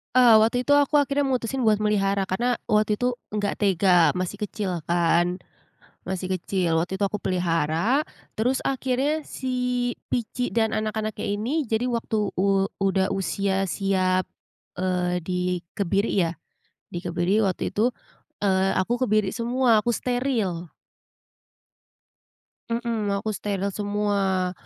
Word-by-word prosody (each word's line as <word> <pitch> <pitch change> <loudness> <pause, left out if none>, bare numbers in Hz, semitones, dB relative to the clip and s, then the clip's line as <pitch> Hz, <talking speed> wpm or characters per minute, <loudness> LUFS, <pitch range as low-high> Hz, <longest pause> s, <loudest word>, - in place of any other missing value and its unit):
Eee, 245 -3 +7
waktu 230 +3 +2
itu 285 - -1
aku 285 +1 +4
akhirnya 285 0 0
mutusin 260 0 -1
buat 210 -1 +4
melihara, 200 -2 +1
karena 240 +7 0 0.2
waktu 210 0 +3
itu 250 +3 0 0.2
nggak 205 -1 0
tega 185 -4 +4
masih 185 +2 -3
kecil 205 -4 -3
kan, 175 +1 +2 0.7
masih 185 0 -4
kecil 180 -1 -1
waktu 190 +3 -3
itu 200 - +1
aku 205 +1 -4
pelihara. 175 - +1 0.3
Terus 250 +4 +1
akhirnya 270 +3 0
si 260 - -6 0.6
Pici 245 +1 -2
dan 220 -1 +1
anak-anaknya 215 0 -2
ini, 270 +9 0
jadi 225 +2 +1
waktu 225 -4 -1
u 195 +1 +2 0.2
udah 195 0 +1
usia 195 0 0
siap, 185 -2 +1 0.5
eee, 180 -1 -1
dikebiri 180 +3 -1 0.2
ya, 165 - -4 0.6
dikebiri 175 +3 0
waktu 185 - -1
itu, 235 +4 +1 0.5
eee, 190 -1 +2
aku 190 +5 0
kebiri 215 -3 +2
semua, 240 -1 +2
aku 240 - -1
steril. 225 - -1 2.0
Mhm, 230 -2 -1
aku 200 +2 -3
steril 200 -1 -2
semua. 200 -2 0
205 Hz, 125 wpm, -25 LUFS, 185-230 Hz, 2.0 s, Eee